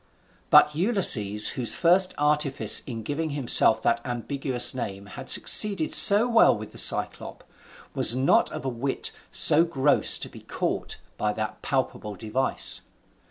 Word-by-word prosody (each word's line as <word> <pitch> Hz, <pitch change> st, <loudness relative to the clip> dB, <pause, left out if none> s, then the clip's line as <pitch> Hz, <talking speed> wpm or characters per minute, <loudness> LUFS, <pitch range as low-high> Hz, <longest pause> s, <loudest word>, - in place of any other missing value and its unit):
But 150 Hz, -, +3 dB
Ulysses, 150 Hz, -, +1 dB
whose 120 Hz, -3 st, -6 dB
first 180 Hz, +2 st, 0 dB
artifice 150 Hz, -2 st, -1 dB
in 115 Hz, -4 st, -9 dB
giving 155 Hz, +7 st, -6 dB
himself 120 Hz, -4 st, +2 dB
that 115 Hz, 0 st, -2 dB
ambiguous 125 Hz, 0 st, -2 dB
name 100 Hz, -6 st, -8 dB
had 100 Hz, -, -11 dB
succeeded 200 Hz, -7 st, +3 dB
so 210 Hz, +4 st, +8 dB
well 230 Hz, -, +2 dB
with 110 Hz, 0 st, -12 dB
the -, -, -8 dB
Cyclop, -, -, -1 dB, 0.5 s
was 115 Hz, -, +1 dB
not 130 Hz, +1 st, 0 dB
of -, -, -10 dB
a -, -, -4 dB
wit 130 Hz, +2 st, -5 dB, 0.2 s
so 155 Hz, +3 st, +4 dB
gross 145 Hz, -4 st, +1 dB
to -, -, -6 dB
be -, -, -16 dB
caught -, -, -6 dB, 0.2 s
by 105 Hz, 0 st, -3 dB
that 110 Hz, 0 st, -8 dB
palpable 130 Hz, -6 st, -5 dB
device. 110 Hz, +7 st, -2 dB
135 Hz, 145 wpm, -22 LUFS, 115-155 Hz, 0.5 s, so